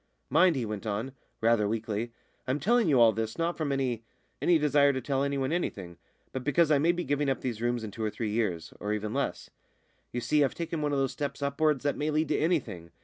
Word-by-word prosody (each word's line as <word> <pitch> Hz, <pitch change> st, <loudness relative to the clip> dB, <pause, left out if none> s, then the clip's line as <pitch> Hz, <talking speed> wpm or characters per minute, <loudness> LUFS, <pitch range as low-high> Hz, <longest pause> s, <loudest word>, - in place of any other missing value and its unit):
"Mind," 180 Hz, -3 st, +5 dB
he 125 Hz, -4 st, -1 dB
went 105 Hz, 0 st, -5 dB
on, 110 Hz, +6 st, -2 dB, 0.3 s
rather 115 Hz, -2 st, +3 dB
weakly, 110 Hz, +1 st, -2 dB, 0.4 s
"I'm 130 Hz, +3 st, 0 dB
telling 230 Hz, -, +3 dB
you 135 Hz, -4 st, +4 dB
all 115 Hz, -1 st, +7 dB
this 110 Hz, +1 st, -3 dB
not 170 Hz, +1 st, 0 dB
from 155 Hz, -3 st, -2 dB
any 130 Hz, -4 st, -1 dB, 0.4 s
any 175 Hz, -, +4 dB
desire 145 Hz, -1 st, +4 dB
to 130 Hz, -, -1 dB
tell 135 Hz, +1 st, -1 dB
anyone 140 Hz, -1 st, -1 dB
anything, 95 Hz, -, -3 dB, 0.3 s
but 130 Hz, -, -4 dB
because 155 Hz, +3 st, +3 dB
I 145 Hz, -, +5 dB
may 165 Hz, +4 st, +4 dB
be 175 Hz, 0 st, -3 dB
giving 145 Hz, 0 st, 0 dB
up 135 Hz, -, -1 dB
these 115 Hz, -4 st, -3 dB
rooms 120 Hz, -1 st, 0 dB
in 110 Hz, -, -5 dB
two 110 Hz, -, -5 dB
or 110 Hz, -, +1 dB
three 105 Hz, 0 st, -3 dB
years, 95 Hz, -8 st, -1 dB
or 105 Hz, +1 st, -2 dB
even 105 Hz, 0 st, -3 dB
less. -, -, -3 dB, 0.6 s
You 120 Hz, -, -2 dB
see, 150 Hz, +4 st, +2 dB
I've 135 Hz, -, 0 dB
taken 165 Hz, -2 st, -3 dB
one 150 Hz, -1 st, 0 dB
of 140 Hz, -, +1 dB
those 135 Hz, -1 st, +1 dB
steps 140 Hz, -1 st, -4 dB
upwards 140 Hz, 0 st, +1 dB
that 145 Hz, -1 st, 0 dB
may 150 Hz, +1 st, -1 dB
lead 155 Hz, +1 st, +1 dB
to -, -, +2 dB
anything. 120 Hz, -, -1 dB
135 Hz, 235 wpm, -29 LUFS, 110-150 Hz, 0.6 s, all